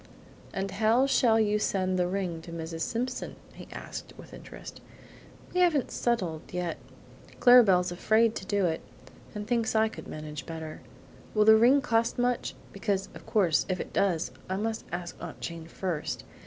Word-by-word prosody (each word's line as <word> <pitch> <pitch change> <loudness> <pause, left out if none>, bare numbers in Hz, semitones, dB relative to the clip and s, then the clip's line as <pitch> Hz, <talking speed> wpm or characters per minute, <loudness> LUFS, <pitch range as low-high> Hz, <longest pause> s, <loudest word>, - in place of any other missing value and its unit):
"How 220 +6 +3
shall 235 -4 +4
you 210 -1 +2
send 185 -3 0
the 180 - +2
ring 180 -3 -2
to 170 - -10
Mrs. 165 0 -5
Simpson?" 250 +5 -3 0.2
he - - -11
asked, - - -8
with - - -13
interest. - - -10 0.7
"We 365 - +1
haven't 320 -7 +3
settled 185 -10 -1
yet; 180 -2 -2 0.6
Clara 245 -1 +9
Belle's 180 -3 +3
afraid 220 +5 +3
to - - -7
do 200 -1 +1
it, 160 -1 -1 0.5
and 210 0 -4
thinks 230 0 0
I 220 0 +4
could - - -10
manage 150 -3 -7
better. 160 -1 -7 0.5
Will 210 0 +4
the 220 0 +9
ring 250 +6 +5
cost 230 -4 +1
much? 245 0 0 0.2
Because, 195 0 -1
of - - -12
course, 180 -7 +2
if 185 -1 -1
it - - -6
does, 175 -5 +1 0.2
I 190 - -1
must 220 +2 -2
ask 175 0 -4
Aunt - - -7
Jane 165 -1 -6
first. 170 -2 -3
200 Hz, 170 wpm, -28 LUFS, 175-225 Hz, 0.7 s, Clara